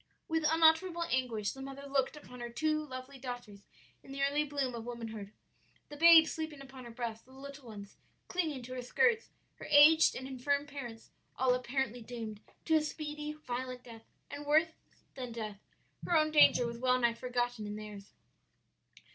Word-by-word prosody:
"With 320 -1 +1
unutterable 330 +2 +4
anguish 235 -5 0
the 270 - -10
mother 275 +1 -8
looked 275 +1 0
upon 250 -4 -12
her 240 0 -5
two 305 +5 0
lovely 265 -1 -9
daughters 245 -5 -7 0.4
in 270 - -14
the 275 0 -2
early 285 +2 +2
bloom 280 -3 -2
of 230 -1 -6
womanhood, 225 -4 -7 0.6
the 295 - -8
babe 330 +1 +8
sleeping 315 -2 -5
upon 265 -2 -11
her - - -8
breast, 230 -1 -5
the - - -18
little 275 0 -10
ones 205 -2 -10 0.3
clinging 315 -8 -2
to 255 +2 -8
her 255 - -4
skirts, 460 - +2 0.3
her - - -9
aged 300 +2 +7
and 260 - -5
infirm 280 +2 -1
parents, 255 -6 -9 0.3
all 255 -1 +3
apparently 250 -1 -2
doomed 225 -2 -7 0.3
to 320 - +1
a - - +2
speedy, 300 0 -5
violent 255 -3 -5
death 225 -2 -13 0.2
and 290 0 -7
worse 315 +2 +4 0.4
than 250 -2 -6
death. 215 -3 -6 0.4
Her 345 - +2
own 310 0 +2
danger 295 -5 +6
was 235 0 -5
well 255 0 +3
nigh 235 -2 +2
forgotten 240 -2 -2
in 205 - -5
theirs. 210 -1 -9
260 Hz, 175 wpm, -32 LUFS, 240-300 Hz, 0.6 s, babe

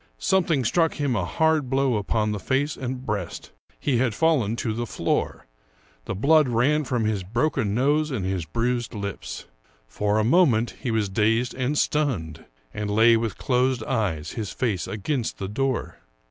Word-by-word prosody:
Something 165 - +1
struck 165 +7 +2
him 140 -5 0
a 95 -5 0
hard 160 - +1
blow 135 -2 +2
upon 105 +1 0
the 105 - -3
face 140 +7 0
and 130 0 -5
breast. 100 -7 -4 0.3
He 135 -4 +1
had 120 -3 +1
fallen 140 -10 +2
to 115 -2 -2
the 120 +1 -3
floor; - - -2 0.6
the - - -3
blood 145 +6 +4
ran 140 +6 +2
from 125 -3 0
his 105 -2 0
broken 115 +2 0
nose 145 +5 +2
and 115 -10 -3
his 95 -2 -1
bruised 120 +8 -2
lips. 100 -1 -5 0.4
For 105 - 0
a 110 - +2
moment 120 -4 +3
he 130 - -2
was 110 -2 +1
dazed 110 +5 +1
and 130 +3 -1
stunned, 120 - -1 0.3
and 105 -1 -3
lay 115 +3 +5
with 115 -3 -2
closed 125 -2 +1
eyes, 95 - -2
his 105 -3 -4
face 105 -9 -1
against 115 +4 -2
the 95 - -4
door. 130 +5 -2
120 Hz, 170 wpm, -24 LUFS, 105-135 Hz, 0.6 s, lay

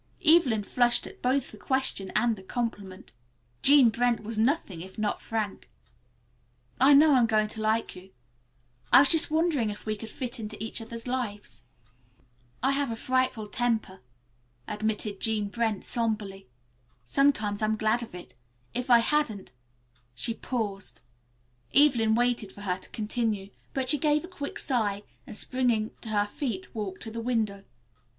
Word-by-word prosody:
Evelyn 290 -10 +5
flushed 240 +3 +2
at - - -12
both 260 +2 0
the - - -13
question 265 -8 -1
and 235 -2 +3
the 190 - -12
compliment. 200 -3 -5 0.5
Jean 280 -4 +7
Brent 235 -1 +1
was 220 0 -4
nothing 225 - 0
if 190 +2 -11
not 215 -1 -1
frank. 215 -3 -4 1.1
"I 275 +2 +7
know 300 +1 +7
I'm 245 -3 +5
going 215 -1 +2
to 220 - -7
like 220 +1 0
you. 185 +1 -12 0.8
I - - +9
was 280 - +4
just 325 - +4
wondering 310 -7 +1
if 205 - -8
we 215 - -1
would 220 +1 -8
fit 245 +1 -5
into 215 -1 -6
each 225 +1 -3
other's 230 0 -7
lives." 225 - -4 1.0
"I 265 - +3
have 275 -1 0
a 225 - -2
frightful 255 -2 0
temper," 220 -5 -1 0.7
admitted 210 -1 -3
Jean 215 -2 0
Brent 220 -2 -1
somberly. 210 -4 -3 0.6
"Sometimes 220 -8 +2
I'm 215 0 +1
glad 220 +2 +1
of 230 -6 -8
it. 180 - -11 0.4
If 250 +1 -3
I 240 - +8
hadn't 230 -7 -1 0.3
" 120 0 -39
She 230 - -1
paused. 210 -5 -4 0.8
Evelyn 245 -6 +5
waited 240 -4 0
for 205 - -13
her 185 -2 -2
to - - -12
continue, 215 -2 -2 0.2
but 260 -2 -1
she 295 - +3
gave 300 +1 +2
a - - -7
quick 290 -6 -6
sigh, 210 -7 -1 0.2
and, - - -6
springing 240 -4 +1
to 225 - -8
her 205 -1 +2
feet, 205 -3 -5
walked 200 -4 -5
to 225 - -6
the 230 +1 -5
window. 220 -5 -1
225 Hz, 160 wpm, -28 LUFS, 210-255 Hz, 1.1 s, I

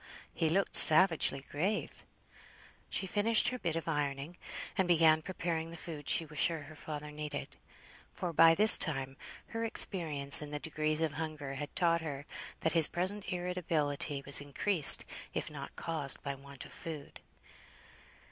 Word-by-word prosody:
he 165 -2 -2
looked 195 +4 -2
savagely 160 -4 +7
grave. 190 +9 -4 0.9
She - - -4
finished 215 +5 +2
her 250 0 -7
bit 165 -6 -4
of 165 - -6
ironing, 145 +1 -5 0.4
and 190 -3 -1
began 160 -2 +2
preparing 165 -2 -5
the 170 - -10
food 155 -3 -8
she 165 - +2
was 150 -2 -8
sure 165 -3 0
her 155 - -14
father 150 -1 -9
needed; 150 0 -8 0.6
for 175 -2 -7
by 165 +1 +4
this 215 +4 +9
time 135 -4 -1 0.3
her 225 0 -6
experience 155 -11 +2
in 150 - -9
the 150 - -6
degrees 155 0 -2
of 160 -2 -2
hunger 155 -3 -7
had 145 +2 -9
taught 170 -1 0
her 145 -3 -8 0.4
that 160 - -1
his 165 -3 +6
present 190 +3 -3
irritability 160 -6 -3
was 140 0 +4
increased, 145 +3 +3 0.3
if - - -5
not - - -11
caused, 155 -5 -5
by 140 - -5
want 140 0 -13
of - - -14
food. 155 -5 -10
160 Hz, 155 wpm, -30 LUFS, 145-175 Hz, 0.9 s, this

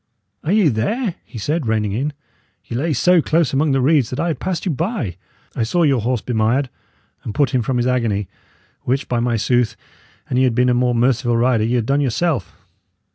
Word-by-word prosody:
"Are 155 - -1
ye 205 -6 +4
there?" 185 - -1
he 120 - -11
said, 145 +5 -2
reining 110 -2 0
in. 135 +8 -2 0.5
"Ye 115 - -6
lay 155 +7 0
so 175 +5 +4
close 155 -3 +1
among 145 +2 +2
the 135 -1 +2
reeds 140 -3 +3
that 130 - -5
I 170 +2 0
had 160 - -3
passed 185 -1 -3
you 185 - +1
by. 155 - -2 0.4
I - - -2
saw 170 +10 +1
your 135 -6 +3
horse 120 0 -1
bemired, 120 +3 0 0.5
and 110 - -6
put 145 0 +2
him 130 - +1
from 125 +2 -1
his 120 - +1
agony; 115 -6 0 0.5
which, 130 +2 -1
by 120 - 0
my 120 -1 0
sooth! 120 0 +1 0.5
an 125 - -1
ye 130 - +4
had 125 -3 +2
been 125 +1 +3
a - - +3
more 125 0 +1
merciful 120 0 +2
rider, 120 -2 +2
ye 120 +2 0
had 120 -3 0
done 140 +4 +1
yourself. 145 +3 0
125 Hz, 215 wpm, -19 LUFS, 115-150 Hz, 0.5 s, ye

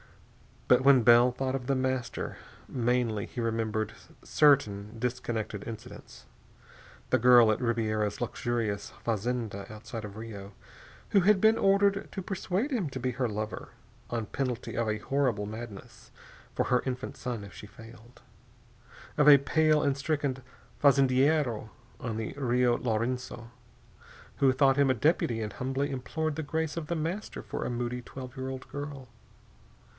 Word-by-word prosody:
But 125 0 +5
when 135 -3 +6
Bell 120 +2 +7
thought 130 +1 -2
of 130 -2 -4
The 135 - +2
Master, 130 -2 -2 0.3
mainly 120 -4 0
he 120 - -5
remembered 110 -1 -1 0.3
certain 110 -9 +2
disconnected 115 -4 -3
incidents. 110 -2 -10 0.9
The 130 - +4
girl 120 -2 +7
at 110 - -1
Ribiera's 110 -3 -1
luxurious 115 -4 -2
fazenda 115 -2 -2
outside 110 +1 -7
of 100 -1 -9
Rio, 105 -3 -8 0.6
who 200 - +5
had 200 +2 +4
been 220 +1 +5
ordered 200 -1 +2
to 195 - -4
persuade 195 +7 -2
him 210 - -1
to 130 - -5
be 130 +1 -1
her 125 0 -1
lover, 110 0 -5 0.4
on 115 -2 -2
penalty 125 -1 -3
of 115 -1 0
a 110 - 0
horrible 120 -2 0
madness 110 -1 -9 0.5
for - - +2
her 125 -1 +3
infant 125 -1 -4
son 120 -4 -4
if 100 -3 -11
she 95 +5 -10
failed. 115 +1 -15 1.0
Of 150 0 +4
a 145 -1 +10
pale 155 +2 +2
and 140 -1 +2
stricken 140 -2 -1 0.4
fazendiero 135 -3 +3 0.3
on 115 -3 -4
the 110 -1 -4
Rio 125 -2 +2
Laurenço 120 +1 -2 0.9
who 135 -1 +4
thought 135 0 +3
him 140 -1 +4
a 130 - +3
deputy 120 -4 +1
and 105 -1 -3
humbly 135 +5 -2
implored 150 +4 -3
the 160 - -2
grace 160 +1 -2
of 160 -3 -4
The 170 - -1
Master 170 +7 -4
for - - -4
a - - -2
moody 120 0 -3
twelve 130 +1 -9
year 130 0 -4
old 130 0 -7
girl. 145 -3 -7
125 Hz, 150 wpm, -29 LUFS, 115-140 Hz, 1.0 s, a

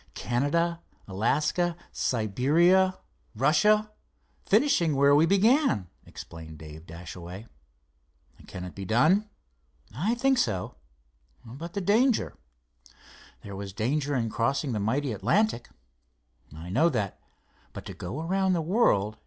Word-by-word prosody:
"Canada, 165 +7 0 0.3
Alaska, 150 - 0
Siberia, 160 - +2 0.4
Russia—finishing 210 - +1
where 140 +1 +4
we 155 +3 +5
began," 200 - +3 0.2
explained 80 -1 -10
Dave 80 +2 -12
Dashaway. 90 +4 -9 1.0
"Can 90 -2 -7
it 90 - -8
be 100 - -7
done?" 155 - +2 0.7
"I 200 - 0
think 265 +1 +2
so." 95 -6 -1 0.7
"But 145 +9 -9
the 200 - -2
danger——" 225 +6 +2 1.1
"There 100 -1 -8
was 100 0 -7
danger 140 +7 -1
in 115 -3 -1
crossing 135 +5 -1
the 110 - -2
mighty 130 +6 -1
Atlantic." 120 - 0 0.8
"I 80 +4 -9
know 160 - +3
that. 110 - -3 0.5
But - - -9
to - - -7
go 110 - -6
around 190 +3 +1
the 170 - 0
world. 110 - +1
140 Hz, 115 wpm, -27 LUFS, -, 1.1 s, we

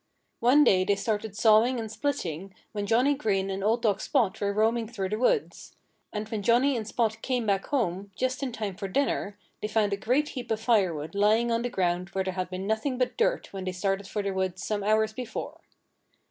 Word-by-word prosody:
One 260 +6 +5
day 185 -8 +4
they 200 +2 +2
started 210 0 -3
sawing 225 +3 +4
and 220 -2 -5
splitting 195 - -3 0.2
when 205 -1 -3
Johnnie 250 +7 +3
Green 195 -8 0
and 195 0 -3
old 225 +3 +1
dog 210 -2 +2
Spot 210 -4 0
were 200 0 +1
roaming 225 +2 +1
through 195 -4 -4
the 215 +2 -2
woods. 420 - 0 0.4
And 210 0 -4
when 220 -2 -3
Johnnie 245 +6 +3
and 220 -3 -3
Spot 220 -1 -1
came 250 -3 -1
back 195 -2 0
home, 200 -7 -1
just 255 +4 -1
in 270 -2 -2
time 215 -5 -4
for 195 0 -5
dinner, 205 -2 -1 0.2
they - - -1
found 215 -1 +1
a - - -1
great 255 +8 +1
heap 250 -3 -6
of 220 -1 0
firewood 185 -10 +1
lying 215 +4 +3
on 230 0 +1
the 245 - -2
ground 180 -3 -1
where 190 - 0
there 185 0 -3
had 185 -1 -3
been 185 +1 -5
nothing 220 +5 -1
but 250 0 0
dirt - - 0
when 190 -1 -5
they 185 - -1
started 195 +1 -1
for 210 0 -3
the 200 - -1
woods 190 -1 -2
some 210 -2 -2
hours 215 +1 +2
before. 225 -1 -6
215 Hz, 215 wpm, -27 LUFS, 195-235 Hz, 0.4 s, One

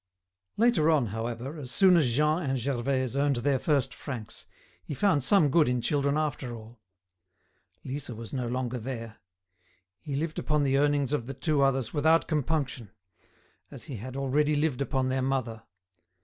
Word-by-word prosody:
Later 215 -9 +3
on, 150 -6 +3
however, 120 +6 -4
as 130 -4 -7
soon 185 +6 +5
as 145 -8 +3
Jean 150 +4 +2
and 135 -4 -1
Gervaise 130 0 -1
earned 140 0 +2
their 130 +2 +1
first 140 -4 +1
francs, 120 -7 -8 0.4
he 145 - -6
found 160 -5 +2
some 150 -1 +4
good 155 -3 +4
in 125 0 0
children 140 +3 0
after 140 -5 -2
all. 115 +1 -13 1.0
Lisa 130 -2 -5
was 115 +3 -8
no 125 -3 -2
longer 125 0 -2
there. 115 -2 -6 0.8
He 145 -4 -5
lived 155 +2 -2
upon 150 -2 +1
the 135 -1 +2
earnings 145 -1 +1
of 120 -5 -1
the 135 - -6
two 145 +2 0
others 135 -3 +1
without 160 +2 +3
compunction, 140 - -1 0.8
as - - -7
he 135 - -6
had 130 +5 -7
already 145 +3 +1
lived 145 -3 0
upon 130 -1 0
their 130 0 0
mother. 130 -4 -2
135 Hz, 165 wpm, -28 LUFS, 125-150 Hz, 1.0 s, soon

